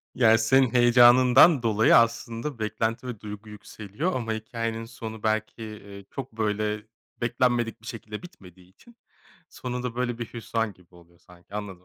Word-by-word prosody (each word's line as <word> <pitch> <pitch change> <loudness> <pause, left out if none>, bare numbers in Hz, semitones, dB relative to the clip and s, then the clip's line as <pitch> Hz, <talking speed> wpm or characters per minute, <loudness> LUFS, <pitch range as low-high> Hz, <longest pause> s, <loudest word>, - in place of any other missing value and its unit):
Ya, 115 -3 +5
senin 125 +2 +3
heyecanından 125 +4 +6
dolayı 110 -1 +4
aslında 115 +3 0
beklenti 110 +3 -2
ve 120 -4 -6
duygu 105 0 -9
yükseliyor 105 - -5
ama 115 -3 -2
hikâyenin 115 +1 -4
sonu 110 -1 -9
belki, 110 0 -3
ııı, 100 -1 -11
çok, 135 -3 -7
böyle, 105 0 -2 0.3
beklenmedik 120 -1 0
bir 115 - -13
şekilde 110 -2 -7
bitmediği 90 - -15
için 230 - -21 0.6
sonu 125 -1 -5
da 125 -2 -4
böyle 120 -1 -2
bir 115 - -4
hüsran 115 -2 -2
gibi 90 -1 -25
oluyor 85 0 -20
sanki 90 +2 -18
anladım. 95 -4 -6
115 Hz, 150 wpm, -26 LUFS, 105-120 Hz, 0.6 s, heyecanından